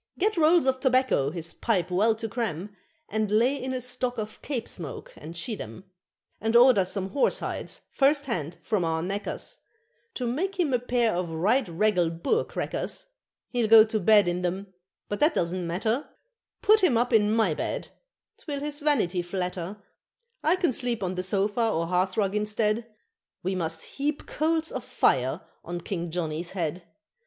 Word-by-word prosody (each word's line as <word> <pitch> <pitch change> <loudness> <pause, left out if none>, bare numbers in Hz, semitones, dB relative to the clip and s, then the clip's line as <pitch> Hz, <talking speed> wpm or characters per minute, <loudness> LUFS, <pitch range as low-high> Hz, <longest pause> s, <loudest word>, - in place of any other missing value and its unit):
Get 425 +3 +1
rolls 330 -1 +5
of 260 -1 +2
tobacco 255 - +2
his 170 +1 -6
pipe 185 -6 0
well 215 +5 +3
to 225 +1 -4
cram, 205 -4 -3 0.3
And 215 0 -1
lay 235 +6 +3
in 260 - -2
a 255 - -1
stock 250 0 -2
of 215 -1 -5
Cape 255 -6 -3
smoke 160 -6 -7
and 165 +3 -9
schiedam, 185 - -5 0.6
And 225 +2 0
order 240 -5 +7
some 190 +1 -3
horse 270 +8 +2
hides, - - -4
first 285 +1 +3
hand, 175 - -3
from 205 -5 0
our 160 0 0
knacker's, 200 - -3 0.6
To 250 - -2
make 360 +12 -2
him 310 -7 +2
a 250 - +3
pair 245 -2 +1
of 175 -1 -2
right 210 +11 +1
regal 180 0 +2
Boer 170 - 0
crackers - - -3 0.4
He'll 240 -3 +1
go 220 0 +9
to 220 0 -1
bed 205 0 +5
in 175 +1 0
them, 190 +2 -3 0.3
but 205 - -3
that 300 +1 +4
doesn't 175 +1 -1
matter; 220 - -1 0.5
Put 430 -1 +5
him 270 -11 +4
up 245 +1 +1
in 210 -1 +4
my 220 -7 +3
bed, - - -3 0.5
'twill 285 -3 -4
his 295 0 -4
vanity 225 - +1
flatter, 180 +2 -4 0.6
I 320 +4 +4
can 360 -7 +1
sleep 240 -5 -1
on 185 0 -1
the 185 - -2
sofa 205 +5 +1
or 165 -5 0
hearthrug 185 +3 +1
instead 210 +2 0 0.5
We 190 +2 0
must 165 -3 -3
heap 290 +1 -3
coals 320 +1 0
of - - -4
fire - - +1 0.2
on 175 0 -5
King 170 -1 -4
Johnny's 165 0 -3
head. 170 -1 -3
215 Hz, 170 wpm, -27 LUFS, 180-255 Hz, 0.6 s, go